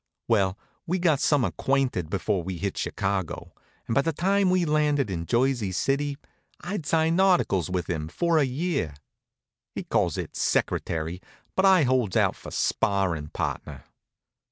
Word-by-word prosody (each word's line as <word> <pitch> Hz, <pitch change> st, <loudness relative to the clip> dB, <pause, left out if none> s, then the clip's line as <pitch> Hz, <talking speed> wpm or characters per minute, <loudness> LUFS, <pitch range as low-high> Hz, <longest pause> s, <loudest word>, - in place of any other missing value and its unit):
Well, 100 Hz, -4 st, +2 dB, 0.3 s
we 180 Hz, +3 st, +1 dB
got 165 Hz, -6 st, +2 dB
some 145 Hz, -5 st, +3 dB
acquainted 130 Hz, -, 0 dB
before 95 Hz, +1 st, 0 dB
we 90 Hz, +1 st, -5 dB
hit 95 Hz, +3 st, -3 dB
Chicago, 95 Hz, -4 st, -3 dB, 0.3 s
and -, -, -1 dB
by 140 Hz, -, +4 dB
the 165 Hz, -, 0 dB
time 195 Hz, +4 st, +2 dB
we'd 180 Hz, -1 st, +2 dB
landed 150 Hz, -6 st, +1 dB
in 85 Hz, -2 st, -4 dB
Jersey 120 Hz, -4 st, +1 dB
City 140 Hz, +8 st, 0 dB, 0.4 s
I'd 175 Hz, -5 st, -5 dB
signed 165 Hz, +3 st, +2 dB
articles 175 Hz, -, +2 dB
with 90 Hz, -2 st, -2 dB
him 80 Hz, -4 st, -2 dB
for 165 Hz, -, +1 dB
a -, -, +4 dB
year. 140 Hz, -, -2 dB, 0.8 s
He -, -, -3 dB
calls -, -, 0 dB
it -, -, -5 dB
secretary, 80 Hz, +7 st, -1 dB, 0.3 s
but 190 Hz, -, +3 dB
I 185 Hz, -4 st, +6 dB
holds 125 Hz, -7 st, +1 dB
out -, -, +3 dB
for -, -, -10 dB
sparrin' 95 Hz, -7 st, 0 dB
partner. -, -, -4 dB
130 Hz, 155 wpm, -26 LUFS, -, 0.8 s, I